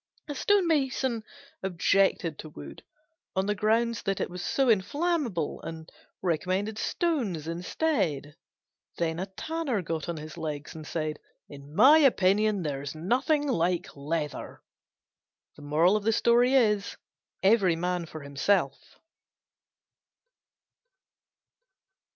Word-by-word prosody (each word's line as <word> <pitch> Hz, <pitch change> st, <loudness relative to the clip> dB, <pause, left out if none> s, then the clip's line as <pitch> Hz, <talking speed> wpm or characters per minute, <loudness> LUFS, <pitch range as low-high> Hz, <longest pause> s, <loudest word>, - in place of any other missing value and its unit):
A 290 Hz, -, -4 dB
Stone 400 Hz, +6 st, +2 dB
mason 265 Hz, -7 st, 0 dB, 0.4 s
objected 185 Hz, -3 st, +1 dB
to 155 Hz, -, -8 dB
wood 70 Hz, -, -11 dB, 0.5 s
on 190 Hz, 0 st, +1 dB
the 210 Hz, -, +1 dB
ground 225 Hz, +3 st, +1 dB
that 195 Hz, -1 st, 0 dB
it -, -, -2 dB
was 180 Hz, +1 st, -6 dB
so 270 Hz, -1 st, +1 dB
inflammable, 235 Hz, -, 0 dB
and 160 Hz, -1 st, -8 dB, 0.3 s
recommended 185 Hz, +5 st, -1 dB
stones 235 Hz, -, -1 dB
instead. 170 Hz, -, -1 dB, 0.6 s
Then 165 Hz, -1 st, -1 dB
a 190 Hz, -, -3 dB
Tanner 270 Hz, -, -3 dB
got 165 Hz, 0 st, -4 dB
on 170 Hz, -, -3 dB
his 155 Hz, +2 st, -8 dB
legs 150 Hz, -2 st, -5 dB
and 155 Hz, -1 st, -9 dB
said, 155 Hz, -2 st, -3 dB, 0.3 s
"In 145 Hz, +1 st, -12 dB
my 275 Hz, -, +8 dB
opinion 210 Hz, -, +3 dB
there's 140 Hz, -1 st, -4 dB
nothing 265 Hz, -, +1 dB
like 180 Hz, -6 st, 0 dB
leather." 150 Hz, +1 st, -4 dB, 2.8 s
Every 195 Hz, -4 st, +4 dB
man 175 Hz, +1 st, -2 dB
for 155 Hz, -, -9 dB
himself. 140 Hz, +1 st, -1 dB
185 Hz, 105 wpm, -28 LUFS, 160-235 Hz, 2.8 s, my